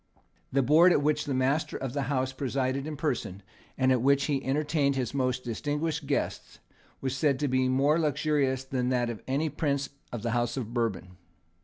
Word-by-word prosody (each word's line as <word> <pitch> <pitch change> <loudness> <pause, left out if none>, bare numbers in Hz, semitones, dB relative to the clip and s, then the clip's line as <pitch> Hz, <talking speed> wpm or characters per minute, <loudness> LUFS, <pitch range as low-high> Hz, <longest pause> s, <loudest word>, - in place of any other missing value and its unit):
The 135 0 +2
board 160 +7 +6
at 145 - +3
which 150 +1 +1
the 140 - -2
master 135 +4 0
of 130 -2 -4
the 140 - -1
house 130 -2 0
presided 135 +1 -1
in 155 -1 -5
person, 120 - -3 0.3
and 130 0 +3
at 125 -2 +3
which 140 +2 +3
he 140 -3 -1
entertained 145 0 +1
his 125 -3 -2
most 130 -2 0
distinguished 150 +5 -2
guests, 140 - -2 0.4
was 130 -1 -2
said 140 0 +2
to 145 - 0
be 130 0 +1
more 140 +5 +3
luxurious 145 -3 +1
than 130 -2 -1
that 120 -2 +1
of 110 - -8
any 140 +4 0
prince 140 -2 -1 0.2
of 120 -3 -5
the 115 - -1
House 120 +1 0
of 120 -3 -4
Bourbon. 100 -6 -2
135 Hz, 190 wpm, -28 LUFS, 125-145 Hz, 0.4 s, board